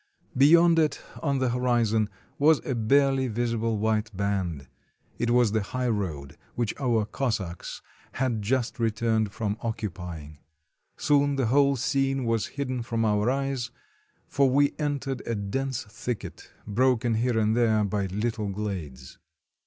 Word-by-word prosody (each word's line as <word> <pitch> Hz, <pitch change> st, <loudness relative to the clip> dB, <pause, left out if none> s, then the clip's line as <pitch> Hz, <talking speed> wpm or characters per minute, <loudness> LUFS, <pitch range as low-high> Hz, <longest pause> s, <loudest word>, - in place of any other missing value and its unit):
Beyond 165 Hz, +5 st, +6 dB
it, 155 Hz, -3 st, +1 dB, 0.2 s
on 140 Hz, -3 st, 0 dB
the 130 Hz, -1 st, +1 dB
horizon, 120 Hz, -3 st, +1 dB, 0.3 s
was 155 Hz, +1 st, +5 dB
a 135 Hz, -, -1 dB
barely 135 Hz, +3 st, +3 dB
visible 115 Hz, -1 st, -1 dB
white 110 Hz, +1 st, 0 dB
band; 95 Hz, -8 st, -2 dB, 0.5 s
it 120 Hz, -, 0 dB
was 120 Hz, -3 st, +4 dB
the 110 Hz, 0 st, +1 dB
highroad 100 Hz, -, -3 dB, 0.2 s
which 120 Hz, -4 st, -1 dB
our 120 Hz, -6 st, +1 dB
Cos 125 Hz, +1 st, -1 dB
sacks 85 Hz, -3 st, -7 dB, 0.3 s
had 125 Hz, -5 st, -1 dB
just 120 Hz, +3 st, -1 dB
returned 110 Hz, -2 st, +1 dB
from 105 Hz, 0 st, -2 dB
occupying. 85 Hz, -9 st, -5 dB, 0.6 s
Soon 145 Hz, -1 st, +2 dB
the 135 Hz, -2 st, +1 dB
whole 140 Hz, +4 st, +4 dB
scene 135 Hz, +1 st, 0 dB
was 115 Hz, -2 st, 0 dB
hidden 130 Hz, -3 st, -2 dB
from 115 Hz, -1 st, -1 dB
our 105 Hz, +1 st, +2 dB
eyes, 135 Hz, -2 st, -1 dB, 0.6 s
for 140 Hz, -1 st, +2 dB
we 140 Hz, +2 st, +3 dB
entered 140 Hz, -3 st, -2 dB
a 115 Hz, -, -1 dB
dense 125 Hz, +6 st, -2 dB
thicket, 110 Hz, +2 st, -6 dB, 0.2 s
broken 120 Hz, +2 st, +2 dB
here 115 Hz, +1 st, +1 dB
and 110 Hz, 0 st, +2 dB
there 110 Hz, -3 st, +3 dB
by 100 Hz, -1 st, -1 dB
little 105 Hz, +2 st, -2 dB
glades. 95 Hz, -11 st, -5 dB
115 Hz, 140 wpm, -27 LUFS, 105-130 Hz, 0.6 s, Beyond